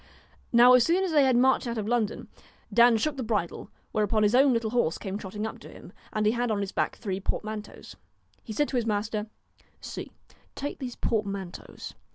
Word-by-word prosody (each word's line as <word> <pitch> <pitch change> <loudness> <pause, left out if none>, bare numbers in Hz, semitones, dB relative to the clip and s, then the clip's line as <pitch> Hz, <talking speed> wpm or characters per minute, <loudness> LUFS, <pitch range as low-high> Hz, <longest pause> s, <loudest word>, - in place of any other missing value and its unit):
Now 245 +1 +7
as 250 -2 +7
soon 350 +6 +2
as 375 - -1
they 295 -3 +5
had 260 -2 +3
marched 260 0 +3
out 235 0 -3
of 210 -1 -3
London, 230 -3 -1 0.5
Dan 235 -1 +6
shook 290 +5 -1
the - - -3
bridle, 210 -4 -2 0.2
whereupon 215 0 +1
his 210 +1 +3
own 270 +2 +6
little 230 -2 0
horse 235 -9 +1
came 195 -1 -5
trotting 205 +1 -5
up 220 - -6
to - - -12
him, - - -13 0.2
and 215 -1 -1
he 215 - +4
had 240 +1 -1
on 210 -2 0
his 200 -1 -3
back - - -1
three 195 -4 -4
portmanteaus. 215 +2 -5 0.5
He 225 - -8
said 290 +7 +1
to 260 - -1
his 235 -2 -1
master: 210 0 -1 0.3
* - - -33
See, - - -6 0.4
take 285 +1 -5
these 250 -3 -5
portmanteaus. 200 -5 -4
220 Hz, 210 wpm, -27 LUFS, 210-245 Hz, 0.5 s, Now